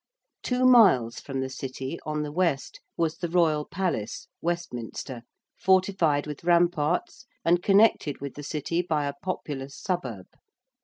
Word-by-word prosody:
Two 250 0 +1
miles 190 - +6
from 135 -2 -4
the 130 - -3
City, 130 +3 -5
on 150 0 -1
the 150 - -5
west, 165 -4 -1 0.2
was 165 -2 0
the 175 - -2
Royal 160 -4 +2
Palace 175 - -3
(Westminster), 130 -7 -4 0.4
fortified 185 -6 +2
with 150 0 -7
ramparts 175 - +1 0.2
and 175 +1 +4
connected 195 -7 +3
with 140 -1 -6
the 145 - -8
City 155 +3 -2
by 155 -4 -1
a 140 - -2
populous 140 -7 -5
suburb. 125 - -3
160 Hz, 140 wpm, -27 LUFS, 140-180 Hz, 0.4 s, miles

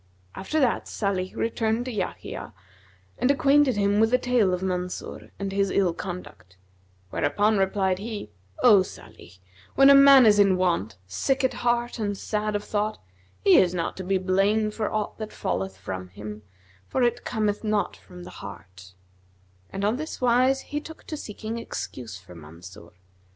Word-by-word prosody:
After 300 +12 -2
that 255 -5 +1
Salih 190 -3 -2
returned 225 +1 -1
to 255 - -4
Yahya 210 - -5 0.6
and 250 - +2
acquainted 280 -2 +4
him 200 0 +2
with 225 0 +4
the 250 - +4
tale 245 -6 +2
of 180 +1 -2
Mansur 180 -1 -4
and 195 -1 -4
his 195 0 +1
ill 190 -4 +1
conduct; 175 - -8 0.5
whereupon 210 0 +1
replied 190 -1 +1
he, 210 - -6 0.3
'O 215 -6 +7
Salih, 95 - -11 0.4
when 275 +1 +7
a - - +9
man 275 -2 +8
is 210 -1 +5
in 195 -2 +5
want, 170 - 0
sick 265 - -1
at 260 - +2
heart 240 0 -1
and 205 -2 -2
sad 210 +1 -2
of 205 - -2
thought, 210 +1 -2 0.5
he 195 - +6
is 180 -1 +3
not 170 -2 -2
to 190 - -5
be 190 +1 +1
blamed 200 +3 +1
for 215 -1 -2
aught 215 0 -3
that 215 -1 -5
falleth 95 0 -3
from 95 -1 -6
him; 105 +3 -9 0.5
for 260 - 0
it 240 0 +1
cometh 210 -2 -1
not 215 -1 0
from 180 -1 -13
the - - -10
heart;' 95 -2 -11 0.7
and 195 +1 -3
on 215 +4 +1
this 310 +2 -6
wise 255 +2 +3
he 295 0 -5
took 320 +1 -11
to 310 - -6
seeking 225 -3 -6
excuse 120 - -6
for 90 -1 -15
Mansur. 85 +5 -12
205 Hz, 170 wpm, -25 LUFS, 180-235 Hz, 0.7 s, a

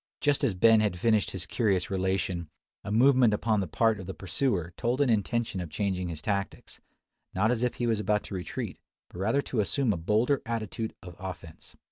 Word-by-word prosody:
Just 145 -1 +1
as 115 -8 +2
Ben 110 +4 +6
had 105 -4 0
finished 110 +2 +2
his 95 -1 -4
curious 100 -3 0
relation, 95 -3 -1 0.3
a 105 - -5
movement 125 -1 +5
upon 110 0 +1
the 95 - -1
part 110 +5 +2
of 95 - -8
the 95 - -5
pursuer 95 - -1
told 125 +2 -1
an 140 -4 +3
intention 110 -2 0
of 85 - -6
changing 95 -1 -2
his 80 -3 -6
tactics, 100 -2 -3 0.5
not 105 +5 +3
as 120 -2 0
if 125 -1 0
he 120 - -2
was 115 -2 +1
about 105 0 +1
to - - -9
retreat, 90 -2 -5 0.3
but 90 - -10
rather 115 +9 +1
to 120 - -3
assume 110 +3 +1
a - - -3
bolder 110 - +1
attitude 115 -1 -4
of 90 -2 -10
offence. 90 -4 -9
105 Hz, 200 wpm, -28 LUFS, 95-115 Hz, 0.5 s, Ben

